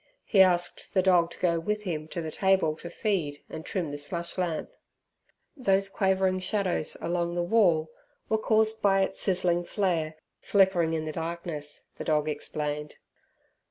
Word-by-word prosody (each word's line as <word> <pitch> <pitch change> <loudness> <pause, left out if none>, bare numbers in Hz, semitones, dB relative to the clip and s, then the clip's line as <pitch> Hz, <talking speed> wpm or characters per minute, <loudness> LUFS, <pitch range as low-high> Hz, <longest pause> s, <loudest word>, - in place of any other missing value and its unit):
He 195 - +5
asked 175 0 +2
the 185 - +4
dog 175 -3 +4
to - - -12
go 170 -2 +1
with 210 +5 -2
him 155 -5 -3
to 170 +1 -4
the 160 - -4
table 190 -5 +2
to 170 - -8
feed 170 -8 -2
and 160 - -7
trim 170 -3 -3
the 145 - -5
slush 170 +4 -4
lamp. 175 -4 -2 0.8
Those 195 -7 +2
quavering 190 -1 +1
shadows 185 -4 -1
along 170 0 -1
the 175 - 0
wall 175 -6 +3 0.4
were 220 - +1
caused 220 0 +2
by 195 -1 +4
its 190 0 -1
sizzling 180 -2 +2
flare 170 -5 -1 0.2
flickering 185 -5 +3
in 155 -1 -2
the 155 - -3
darkness, 165 -2 -4
the - - -5
dog 150 -1 +1
explained. 150 0 -3
175 Hz, 160 wpm, -28 LUFS, 160-195 Hz, 0.8 s, He